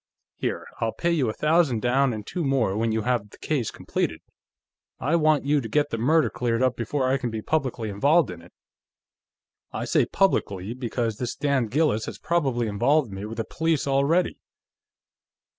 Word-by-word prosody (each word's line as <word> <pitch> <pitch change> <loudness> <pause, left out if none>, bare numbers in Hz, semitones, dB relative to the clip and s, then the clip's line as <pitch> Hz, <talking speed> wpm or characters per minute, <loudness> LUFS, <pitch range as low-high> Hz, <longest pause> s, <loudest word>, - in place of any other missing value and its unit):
Here; - - -3
I'll 115 -1 -1
pay 170 - 0
you 145 -9 +1
a - - -2
thousand 150 -7 +2
down, 130 +2 +3
and 105 -2 -5
two 175 - -3
more 130 -8 +1
when 115 +1 0
you 110 -1 -1
have 120 -3 0
the - - -16
case 135 -8 -1
completed; - - -3 0.8
I 155 - +1
want 155 -3 +3
you 145 0 +2
to 115 - -6
get 145 +5 +1
the 115 - -2
murder 155 +7 +3
cleared 120 0 0
up 130 -2 +2
before 130 +4 -1
I 130 +1 +2
can 125 - -2
be 110 -1 -5
publicly 130 -8 -1
involved 140 - +3
in 85 -1 -9
it. 85 - -17 1.2
I - - -4
say - - +2
publicly, 100 - 0
because 120 -3 -2
this 125 0 -3
damned 140 -5 0
Gillis 130 -4 +1
has - - -6
probably 135 -9 0
involved 120 +5 +2
me 95 +1 -6
with 110 +1 -7
the 115 - -2
police 160 -3 0
already." 140 +6 +1
125 Hz, 185 wpm, -25 LUFS, 110-150 Hz, 1.2 s, down